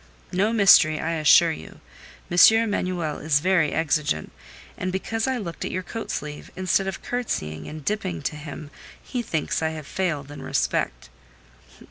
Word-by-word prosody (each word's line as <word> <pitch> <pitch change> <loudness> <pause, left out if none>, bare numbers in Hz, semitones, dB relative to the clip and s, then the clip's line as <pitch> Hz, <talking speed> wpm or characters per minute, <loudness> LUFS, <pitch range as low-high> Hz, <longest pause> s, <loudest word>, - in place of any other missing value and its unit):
"No 195 +4 +1
mystery, 190 -8 +6
I 165 - -2
assure 165 +1 +5
you. 160 - -9 0.5
M. 175 - -1 0.2
Emanuel 185 -8 -1
is 150 -2 +2
very 175 -2 +2
exigeant, 150 - 0 0.4
and 185 - -3
because 225 +5 -2
I 260 -1 0
looked 175 -7 -6
at - - -3
your 185 - -3
coat 225 +4 -6
sleeve, 150 0 -5
instead 185 +1 +1
of 195 - -5
curtseying 80 - -3
and 155 -1 -8
dipping 90 - -2
to - - -2
him, 150 0 -8 0.3
he 250 - -4
thinks 160 -10 -2
I 160 - +1
have 155 - -8
failed 150 -6 -2
in 145 - -9
respect." - - -1
165 Hz, 160 wpm, -24 LUFS, 150-195 Hz, 0.5 s, mystery